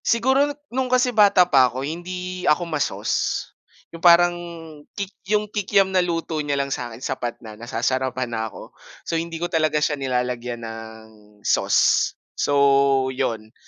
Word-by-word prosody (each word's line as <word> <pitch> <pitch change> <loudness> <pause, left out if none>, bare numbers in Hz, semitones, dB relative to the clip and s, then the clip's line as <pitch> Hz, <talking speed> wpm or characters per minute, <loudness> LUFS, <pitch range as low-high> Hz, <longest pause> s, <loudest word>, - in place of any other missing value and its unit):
Siguro 265 +5 +3 0.2
nung 260 0 -1
kasi 250 0 +2
bata 205 -4 +6
pa 135 -7 +4
ako 130 +2 -5
hindi 180 +3 -5
ako 170 +4 +2
ma-sauce, 155 -3 -2 0.4
yung 165 - -9
parang 175 0 +6
yung 165 -3 -10
kik 200 -1 -4 0.2
yung 210 0 +2
kikiam 200 -2 +1
na 185 - +4
luto 165 -3 -2
niya 145 -1 -1
lang 140 -1 -1
sa 120 -1 -4
akin 115 - -10
sapat 120 -1 -3
na, 110 - -8
nasasarapan 125 +2 -2
na 110 0 -2
ako. - - -12 0.3
So, - - -4
hindi 165 0 -2
ko 170 - -2
talaga 160 -3 +1
siya 150 -1 0
nilalagyan 125 -2 -2
ng 110 0 -9 0.4
sauce. - - +3 0.2
So, 140 -2 +3
yun, 115 -4 -3
150 Hz, 160 wpm, -22 LUFS, 130-180 Hz, 0.4 s, bata